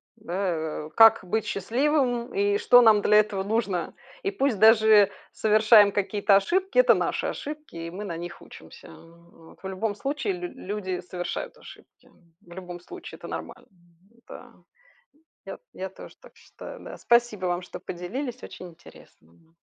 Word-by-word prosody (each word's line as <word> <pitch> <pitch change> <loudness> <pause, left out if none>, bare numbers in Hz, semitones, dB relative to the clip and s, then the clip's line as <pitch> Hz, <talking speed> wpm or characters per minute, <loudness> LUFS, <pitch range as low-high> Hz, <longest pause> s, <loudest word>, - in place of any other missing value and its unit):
да, 175 -7 -4
э, - - -10
как 225 -3 +6
быть 220 +4 -1
счастливым, 245 +3 -1
и 405 0 +1
что 245 -10 +6
нам 220 -3 +5
для 210 +1 +4
этого 210 -2 +1
нужно. 200 -5 -2 0.3
И 195 - -1
пусть 250 +1 0
даже 220 -2 +6 0.2
совершаем 215 -1 +5
какие-то 200 0 +2
ошибки, 380 - 0
это - - +6
наши - - -2
ошибки, 300 - -7
и 165 0 -6
мы 205 +3 -7
на 170 - -5
них 175 +1 -8
учимся, - - -14
а, - - -14 0.4
вот, 160 - -18
в 190 - -5
любом 205 +2 -3
случае 295 - -3
лю-люди 210 - -5
совершают 180 0 -6
ошибки, - - -17 0.3
в 175 - -21
любом 180 -1 -9
случае 180 - -11
это - - -10
нормально, - - -8
м-да. 180 +6 -17 0.9
Я - - -7
т - - -40
я 190 +1 -6
тоже 190 - -13
так - - -18
считаю - - -12
да. - - -10
Спасибо 235 -5 +1
вам, 175 0 -1
что 180 - -10
поделились, 240 +9 -6
очень 180 - -10
интересно. 160 - -20
205 Hz, 160 wpm, -25 LUFS, 180-235 Hz, 0.9 s, как